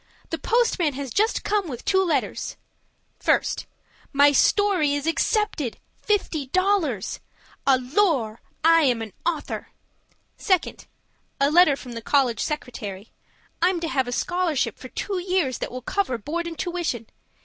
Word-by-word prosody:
The - - -2
postman 450 - +2
has 270 -1 -5
just 435 +3 +1
come 410 -3 0
with 250 -6 -7
two 380 0 +3
letters. 345 - -1 0.7
1st. - - +1 0.5
My 285 0 +6
story 355 -2 +3
is 290 0 -3
accepted. 330 - 0 0.3
$50. 355 - 0 0.5
ALORS! 260 - +2 0.3
I'm 305 -8 +5
an 215 - -9
AUTHOR. 325 -4 -2 0.7
2nd. 370 -5 0 0.5
A 280 +1 +3
letter 330 -3 +6
from 255 -2 -10
the 230 -1 -6
college 255 -1 +2
secretary. 215 -9 -5 0.5
I'm 355 0 +3
to 330 -1 -3
have 265 -4 0
a - - -3
scholarship 350 +1 0
for - - -9
two 395 -3 -3
years 360 -8 0
that - - -4
will 255 0 -6
cover 370 -6 -1
board 330 +10 -3
and 330 -1 -6
tuition. 345 - -2
310 Hz, 135 wpm, -24 LUFS, 255-365 Hz, 0.7 s, My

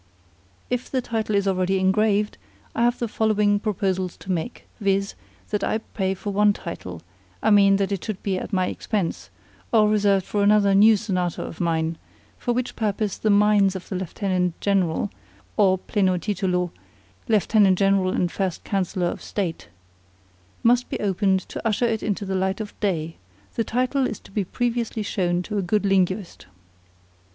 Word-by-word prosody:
If 250 0 -2
the 260 - 0
title 225 -3 -2
is 200 0 +1
already 190 0 +1
engraved, 205 +2 +1 0.3
I - - -1
have 240 +1 +2
the 240 - -1
two 220 - -9
following 210 -2 +2
proposals 190 -4 -1
to 190 - -6
make; 180 +7 -3
viz., 200 -1 0 0.4
that 210 - -1
I - - +1
pay 195 -3 -3
for 200 +2 -5
one 205 +1 +4
title 90 - -7 0.4
I - - +3
mean 200 -1 +6
that 195 0 0
it 195 -4 -2
should 215 -4 -5
be 190 -2 0
at - - -7
my 185 -2 +1
expense, 190 -1 -3 0.4
or 215 -2 +5
reserved 200 -3 +2
for 205 - -1
another 200 -1 +4
new 210 +2 +6
sonata 185 -5 -2
of 165 - -7
mine, 165 -1 0 0.4
for 245 - -1
which 245 +1 -2
purpose 210 -2 -1
the 215 - +1
mines 205 -1 +4
of 185 - -7
the 190 - -3
Lieutenant 180 -1 -1
General 195 -1 +1 0.4
(or 190 -3 +4
pleno 185 -1 +1
titulo, 180 -2 -1 0.6
Lieutenant 210 -3 +4
General 195 -1 +3
and 180 -1 0
First 190 -3 -2
Councillor 185 -2 -1
of 175 - -3
State) 180 - -4 1.0
must 245 +1 +3
be - - -3
opened 195 -1 +1
to - - -8
usher 225 +2 +1
it 225 -2 0
into 205 -1 -2
the 190 - -3
light 190 +1 0
of 215 -2 -5
day; 165 -5 -1 0.4
the 230 - 0
title 255 +3 0
to 200 - -10
be 205 0 0
previously 235 0 -2
shown 180 -3 0
to 210 +2 -3
a - - +1
good 205 +3 0
linguist. 190 0 0
200 Hz, 170 wpm, -24 LUFS, 185-215 Hz, 1.0 s, mean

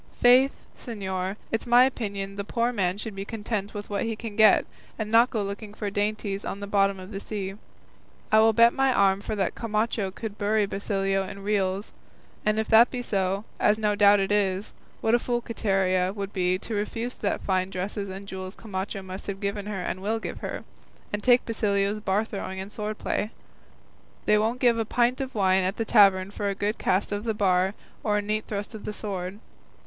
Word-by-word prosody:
Faith, 255 +3 +5
señor, 190 -5 -4 0.2
it's 225 +2 -1
my 240 +1 +7
opinion 200 -6 -2
the 200 - -3
poor 235 +4 0
man 190 -4 0
should 215 +1 -6
be 195 - -4
content 210 -1 -4
with 205 0 -5
what 200 -1 -2
he 225 -1 -2
can 215 -1 -7
get, 220 0 +6 0.3
and 215 -1 -4
not 230 +2 +6
go 215 -3 -1
looking 205 +1 -6
for 205 -2 -3
dainties 205 -1 -1
in 200 - -4
the 200 - -5
bottom 200 -1 +2
of 185 +2 -10
the 195 - -4
sea. 200 -2 -4 0.8
I 215 - +6
will 220 +1 +6
bet 235 +2 +6
my 270 -1 +2
arm 200 -4 +3
that 200 -3 -1
Camacho 215 -2 -1
could 210 +2 -7
bury 210 0 +2
Basilio 195 -1 -1
in 195 +1 -8
reals; 200 -1 -1 0.5
and 215 0 +1
if 220 - 0
that 230 +2 +7
be 245 -1 -4
so, 195 -1 -1
as 210 - +4
no 210 -1 +1
doubt 205 0 +6
it 195 +1 0
is, 200 -1 0 0.3
what 225 - +2
a 240 - +5
fool 240 0 -1
Quiteria 190 -5 +1
would 200 -1 -5
be 185 -1 +1
to 220 - -7
refuse 225 +4 -2
the 200 - -1
fine 185 -1 +1
dresses 195 +2 -4
and 195 +1 -8
jewels 190 0 -6
Camacho 195 -1 -5
must 190 +1 -7
have 195 -1 -4
given 200 0 -3
her 200 -3 -3
and 185 - -3
will 215 +3 0
give 225 - -6
her, - - -5 0.5
and 205 - -1
take 245 +2 +4
Basilio's 205 -2 0
bar 205 +1 0
throwing 190 -3 -5
and 195 +2 -6
sword 210 0 -4
play. 210 - -1 1.0
They 210 - +4
won't 225 +4 0
give 235 -2 +4
a - - +2
pint 245 +4 +1
of 265 -2 -5
wine 190 -2 +3
at 190 +2 -1
the 225 - -1
tavern 195 -3 +5
for 205 0 -2
a 200 - -2
good 205 +2 -2
cast 190 +3 +1
of 205 0 -2
the 225 -2 -1
bar 190 -1 +2 0.3
or 210 -1 +2
a - - +1
neat 215 +1 -1
thrust 205 +2 -4
of 220 - -8
the 210 - -3
sword. 195 -2 -4
205 Hz, 210 wpm, -26 LUFS, 195-220 Hz, 1.0 s, my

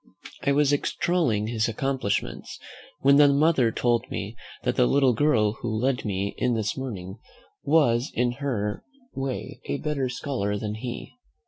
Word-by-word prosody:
I 140 - +1
was 145 0 +3
extolling 145 - +1
his 110 -1 0
accomplishments, 125 -2 -2 0.4
when 140 +1 +6
the 145 0 +8
mother 140 -4 +3
told 120 +1 0
me 105 +4 -5 0.3
that - - 0
the - - +4
little 135 - +4
girl 110 -5 +2
who 120 - -2
led 125 +4 0
me 100 -1 -2
in 125 -1 +1
this 110 -2 -1
morning 105 -7 -6 0.5
was 140 -4 +3
in 120 0 +2
her 105 -7 -2 0.3
way 135 -1 -4
a 70 - -2
better 140 -4 -2
scholar 125 -6 -2
than 105 0 -3
he. 120 +3 -6
125 Hz, 150 wpm, -26 LUFS, 105-140 Hz, 0.5 s, the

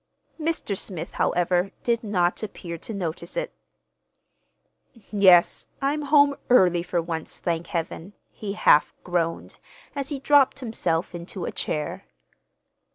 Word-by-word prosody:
Mr. 315 -10 -2
Smith, 180 -3 -5
however, 180 +2 +1
did 235 -1 0
not 180 -5 0
appear 180 -5 -6
to 165 - -8
notice 185 - -5
it. - - -2 1.6
"Yes, 190 -4 +5
I'm 285 +2 0
home 285 -1 +4
early 180 -8 +5
for 175 0 -1
once, 165 -1 -5
thank 170 -1 -2
Heaven!" 170 +2 -4 0.2
he 200 -2 -5
half 150 -7 +4
groaned, 170 -2 -2 0.4
as 275 -1 -3
he 290 - -2
dropped 275 0 +4
himself 220 -10 -1
into 175 +2 -6
a - - -3
chair. 150 -1 -3
190 Hz, 125 wpm, -25 LUFS, 170-255 Hz, 1.6 s, Yes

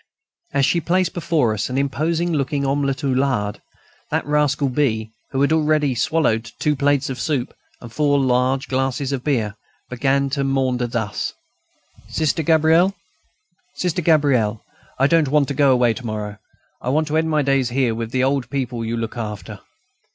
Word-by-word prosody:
As 140 - +2
she 170 - +1
placed 180 +2 +1
before 155 -9 +1
us 110 +2 -2
an 125 - -2
imposing 160 +5 0
looking 140 -1 -1
omelette 135 -1 -1
au 140 - +1
lard, 130 -6 0 0.5
that - - -1
rascal 145 -1 +1
B., 115 -5 0 0.2
who 135 - -1
had 140 +3 +3
already 155 -3 +2
swallowed 115 -5 0
two 150 -1 +1
plates 140 0 +1
of 130 - -6
soup 140 -5 -1 0.3
and 120 -2 -10
four 145 0 +2
large 130 0 +1
glasses 135 +1 -1
of 135 -3 -3
beer, 115 -8 0 0.4
began 135 +2 +1
to 140 0 0
maunder 130 -2 0
thus: 115 -3 -3 0.7
"Sister 160 +1 0
Gabrielle,... 160 +4 +3 0.8
Sister 180 -1 -1
Gabrielle, 140 -10 +2 0.3
I 135 - +3
don't 160 0 +3
want 145 0 +2
to - - -1
go 140 0 +4
away 125 -2 +3
to 130 - -9
morrow. 105 -2 -5 0.4
I 125 - -3
want 155 +3 +1
to 155 - +1
end 160 0 +1
my 155 -2 +2
days 135 -2 +1
here 125 -2 +1
with 115 0 -4
the 130 +2 0
old 135 -2 0
people 125 -4 -3
you 115 +1 -2
look 115 +1 -4
after. 105 -2 -6
135 Hz, 175 wpm, -21 LUFS, 125-150 Hz, 0.8 s, go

